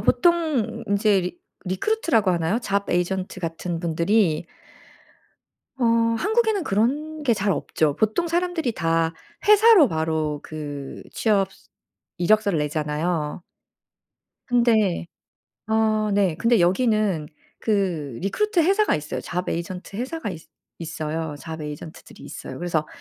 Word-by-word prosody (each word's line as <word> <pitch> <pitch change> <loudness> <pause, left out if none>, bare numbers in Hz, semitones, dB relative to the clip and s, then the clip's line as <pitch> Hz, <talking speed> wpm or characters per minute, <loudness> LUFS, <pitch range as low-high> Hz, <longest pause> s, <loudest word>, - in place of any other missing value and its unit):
보통 330 - +1
인제 200 -1 +3
리 180 0 -5 0.3
리크루트라고 220 - +1
하나요? 170 +5 +1
잡 200 -2 -1
에이전트 185 +1 -1
같은 165 0 -3
분들이 170 0 +1 1.3
어 250 - -1 0.3
한국에는 440 - +1
그런 295 +9 0
게 240 -4 +3
잘 200 -1 0
없죠. 155 -4 0
보통 220 +11 +1
사람들이 340 -6 0
다 165 -3 0 0.3
회사로 425 - +7
바로 160 -2 -1
그 145 -3 -7
취업 200 -3 +1
스 - - -23 0.5
이력서를 200 -1 +3
내잖아요. 150 +2 -2 1.1
근데 225 -8 +2 0.6
어 215 -1 +2
네 195 -5 +2
근데 230 -3 +3
여기는 190 -4 +2 0.3
그 175 - -1
리크루트 365 - 0
회사가 395 +6 +3
있어요. 150 +1 -5
잡 180 +1 -4
에이전트 180 +3 -4
회사가 255 -1 -3
있 165 -3 -8 0.4
있어요. 160 -1 -4
잡 160 +3 -7
에이전트들이 150 +1 -9
있어요. - - -8
그래서 170 -3 -1
195 Hz, 270 characters per minute, -23 LUFS, 165-235 Hz, 1.3 s, 회사로